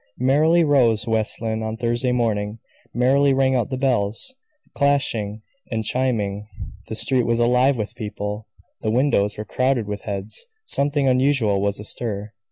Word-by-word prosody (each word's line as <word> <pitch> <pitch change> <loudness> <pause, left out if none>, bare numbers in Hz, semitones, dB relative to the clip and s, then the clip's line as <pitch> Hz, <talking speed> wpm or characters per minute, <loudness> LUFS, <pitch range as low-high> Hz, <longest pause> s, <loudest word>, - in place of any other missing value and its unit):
Merrily 155 +7 +3
rose 120 -7 +3
West 110 0 0
Lynne 110 0 -2
on 110 0 -4
Thursday 120 +2 0
morning; 110 -3 -1 0.3
merrily 135 +3 +3
rang 135 0 +2
out 125 0 0
the 130 - -3
bells, 125 - 0 0.4
clashing 115 -7 0 0.3
and 110 -2 -2
chiming. 105 -5 -1 0.4
The 110 - -5
street 125 +1 +2
was 115 0 +2
alive 125 +3 +3
with 105 -2 -4
people; 105 0 -5 0.3
the 110 - -1
windows 110 -4 +1
were 105 - -5
crowded 130 +2 0
with 105 0 -4
heads; 100 - -3 0.2
something 140 - +2
unusual 130 -6 +2
was 100 0 -1
astir. 105 0 -5
115 Hz, 150 wpm, -22 LUFS, 105-130 Hz, 0.4 s, Merrily